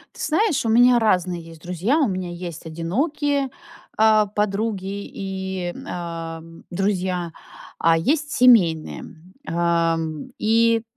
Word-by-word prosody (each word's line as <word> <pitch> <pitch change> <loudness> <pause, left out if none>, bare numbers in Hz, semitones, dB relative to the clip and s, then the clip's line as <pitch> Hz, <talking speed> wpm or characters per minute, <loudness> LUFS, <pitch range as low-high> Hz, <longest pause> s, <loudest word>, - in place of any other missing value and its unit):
Ты - - -9
знаешь, 325 -1 +1
у - - +1
меня 245 +2 +6
разные 180 -5 +1
есть 165 -1 -13
друзья. 180 - 0
У 285 - +3
меня 185 -3 -3
есть 175 -1 -7
одинокие, 275 - -1 0.5
а, 215 -1 +5
подруги 200 -1 -2
и 190 -2 -4
м, - - -10
а, 165 -2 -5 0.3
друзья, 180 -2 -1 0.5
а 165 0 +4
есть 295 - 0
семейные. 190 -11 +4 0.4
Ам, 165 -2 0
и, 230 +1 +3
190 Hz, 120 wpm, -22 LUFS, 170-230 Hz, 0.5 s, меня